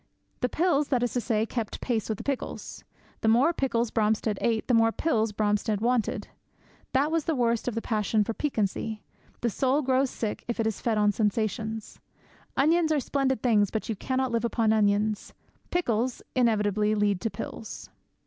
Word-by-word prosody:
The 250 - 0
pills, 305 -3 +2
that 250 -3 +1
is 245 - -1
to 245 - 0
say, 220 -2 +1
kept 230 -2 -4
pace 230 -4 -1
with 215 - -1
the - - -7
pickles. 275 -2 -4 0.4
The - - -1
more 245 +9 +4
pickles 240 -6 0
Bromstead 215 -1 +1
ate, 225 -2 0
the 250 - +2
more 225 0 +5
pills 225 -6 0
Bromstead 210 0 0
wanted. 235 0 0 0.7
That 280 +4 +2
is 330 -3 +1
the 325 - 0
worst 235 -2 +1
of 245 - -1
the 230 - -2
passion 215 -1 +1
for 225 - -3
piquancy. 220 -4 -2 0.4
The 235 - +1
soul 270 +6 +1
grows 260 +1 +2
sick 220 -4 -4
if 235 - -2
fed 220 0 0
on 210 0 +4
sensations. 220 +1 -2 0.6
Onions 320 +3 +3
are 305 - +3
splendid 265 -2 0
things, 210 -5 +3
but 220 - -4
you 220 - 0
cannot 260 +4 -1
live 230 -1 0
upon 230 -2 +2
onions. 210 0 +1 0.3
Pickles 245 -8 0
inevitably 215 -3 +2
lead 205 -3 +1
to 225 - 0
pills. 220 - -7
230 Hz, 175 wpm, -27 LUFS, 215-255 Hz, 0.7 s, more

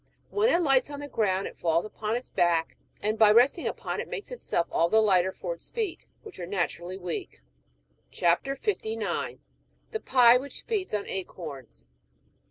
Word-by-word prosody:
When 425 +3 +3
it 350 -6 +3
lights 270 -2 +3
on 285 -1 -6
the 290 - -6
ground 195 -7 0
it - - -8
falls 165 +1 +1
upon 215 +1 -3
its 245 - -5
beak, 170 -2 +1 0.3
and 215 +1 0
by 215 -2 +7
resting 250 +9 +4
upon - - -3
it - - -7
makes 485 -2 -6
itself 465 - -1
all 170 - +2
the 220 - +5
lighter 190 -4 +3
for - - -4
its - - -13
feet, 435 -7 -4 0.2
which 430 -4 -11
are 175 - -5
naturally 180 -1 -2
weak. 175 - -5 0.7
CHAP. 170 0 +2
59. 225 - -2 0.5
THE 440 - -2
PIE 250 - +6
WHICH 280 +2 -8
FEEDS 400 - -2
ON 205 - -3
ACORNS. 145 - -7
215 Hz, 175 wpm, -28 LUFS, 175-285 Hz, 0.7 s, by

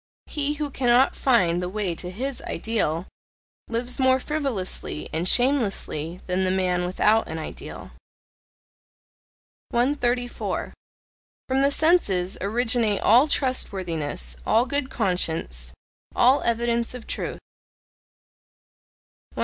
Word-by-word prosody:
He 295 -1 -1
who 295 -1 -3
cannot 250 0 +3
find 180 -10 +2
the 180 - -3
way 195 -2 -2
to 180 +2 -7
HIS 255 +8 -4
ideal, 180 -7 -1 0.6
lives 245 +2 -2
more 260 0 +4
frivolously 255 - -3
and 165 +3 0
shamelessly 195 - 0
than 185 +1 0
the 185 - +1
man 180 -1 +1
without 210 +4 +2
an 160 - -5
ideal. 160 - -8 1.8
134. 245 -1 -1 0.7
From 265 +1 +1
the 280 - +4
senses 280 - +2
originate 225 0 +1
all 245 +7 +6
trustworthiness, 170 - -1
all 235 +2 +3
good 280 0 -1
conscience, 160 - -1 0.4
all 255 +3 +5
evidence 235 +1 0
of 245 - -9
truth. - - -4 2.0
135. - - -8
225 Hz, 110 wpm, -24 LUFS, 180-260 Hz, 2.0 s, all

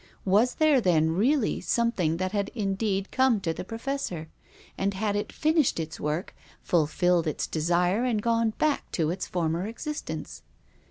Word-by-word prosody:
Was 210 +6 +3
there 305 -4 +4
then 160 -5 +3
really 230 - +1
something 195 -9 +1
that 185 +1 -2
had 200 -1 -1
in 200 -4 0
deed 195 -1 -1
come 260 -4 +3
to 165 -3 -1
the - - -6
Professor? 225 - -4 0.5
And 195 0 -1
had 205 +1 -1
it 205 - -2
finished 310 - +2
its 160 -1 -5
work, 150 +5 -2 0.3
fulfilled 175 +1 +2
its 155 - -1
desire 175 +7 +1
and 240 -4 +1
gone 230 0 +1
back 305 -2 0
to 160 -2 +1
its 185 +1 -4
former 170 +1 -1
existence 300 +7 -6
195 Hz, 160 wpm, -27 LUFS, 170-235 Hz, 0.5 s, there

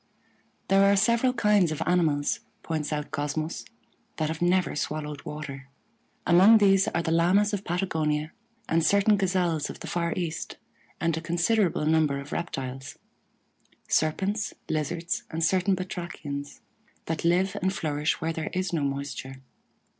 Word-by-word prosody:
There 195 0 +5
are - - +4
several 235 +5 +3
kinds 210 -8 +3
of 155 - -2
animals, 160 -5 +1 0.2
points 155 -2 -3
out 150 -1 -3
Cosmos, 155 +2 -3 0.5
that 155 -1 -1
have 160 +1 -4
never 180 +1 +2
swallowed 150 -1 -4
water. 140 -3 -7 0.6
Among 190 +6 +7
these 195 -2 +4
are 170 - -1
the 160 - -1
Lamas 185 +5 +3
of 200 -1 -2
Patagonia 160 -4 -1 0.4
and 165 0 +2
certain 200 +4 +4
Gazelles 180 -5 0
of - - -8
the - - -6
far 170 -1 -1
east, 170 -3 -4 0.4
and 165 -1 +1
a 160 - -4
considerable 170 +1 +1
number 155 -3 +2
of 140 +3 -9
reptiles 135 -3 -5 0.9
Serpents, 195 +7 0
Lizards, 165 +2 -2
and 165 0 -2
certain 185 +3 +2
Batrachians 170 -6 -6 0.4
that 160 -1 -3
live 180 +3 +2
and 190 +1 +1
flourish 150 -4 -1
where 165 0 -2
there 160 -1 -4
is 185 -1 -2
no 160 - +1
moisture. 135 -1 -4
165 Hz, 145 wpm, -27 LUFS, 150-185 Hz, 0.9 s, Among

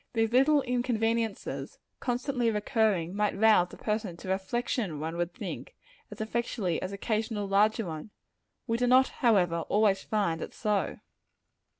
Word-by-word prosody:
These 225 -1 +1
little 275 +3 +5
inconveniences, 230 -3 -1 0.2
constantly 250 -1 0
recurring, 210 -5 +1
might 210 -1 0
rouse 210 -4 +4
a - - -11
person 210 -5 -2
to 185 - -8
reflection, 190 - -1
one 160 +2 -4
would 175 0 -1
think, - - -7 0.3
as - - -10
effectually 220 -5 -2
as 185 - -4
occasional 215 0 -2
larger 210 +3 +3
ones. 160 +3 -6 0.6
We 230 - 0
do 245 - +2
not, 255 +2 +5
however, 185 -8 +2
always 205 -2 +3
find 195 -7 -1
it - - -7
so. 210 -3 -1
215 Hz, 140 wpm, -29 LUFS, 190-235 Hz, 0.6 s, little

